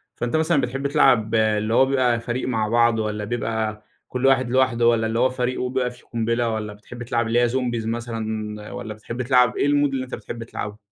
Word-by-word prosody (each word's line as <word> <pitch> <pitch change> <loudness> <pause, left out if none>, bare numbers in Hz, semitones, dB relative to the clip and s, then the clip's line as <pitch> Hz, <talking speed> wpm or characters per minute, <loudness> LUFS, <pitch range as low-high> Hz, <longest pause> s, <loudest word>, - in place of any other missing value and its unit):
فأنتَ 120 +4 -2
مثلًا 160 -2 +2
بتحب 135 +3 -2
تلعب 115 -5 +3
اللي 110 0 +1
هو 130 - +5
بيبقى 130 -3 +2
فريق 120 +2 -3
مع 110 -4 0
بعضه، 115 -1 +3
والّا 105 0 -3
بيبقى 110 -1 -2 0.2
كل 125 +1 -2
واحد 130 -2 +3
لوحده، 130 -3 +3
والّا 115 -1 +3
اللي 115 +1 -1
هو 130 +1 +4
فريقه 125 0 -2
بيبقى 125 -1 -1
فيه 125 - -17
قُنبلة، 115 0 -1
والّا 110 -2 -3
بتحب 120 +4 -10
تلعب 120 -1 -1
اللي 115 +2 +2
هي 120 - +3
zombies 120 -2 -1
مثلًا، 110 -2 -4
والّا 110 -2 -6
بتحب 115 +3 -6
تلعب 125 -1 +3
أيه - - +2
الMood 145 - +3 0.2
اللي 130 -1 -2
أنتَ 130 - -6
بتحب 115 -1 -7
تلعبه؟ 105 -2 -6
120 Hz, 210 wpm, -23 LUFS, 110-125 Hz, 0.2 s, هو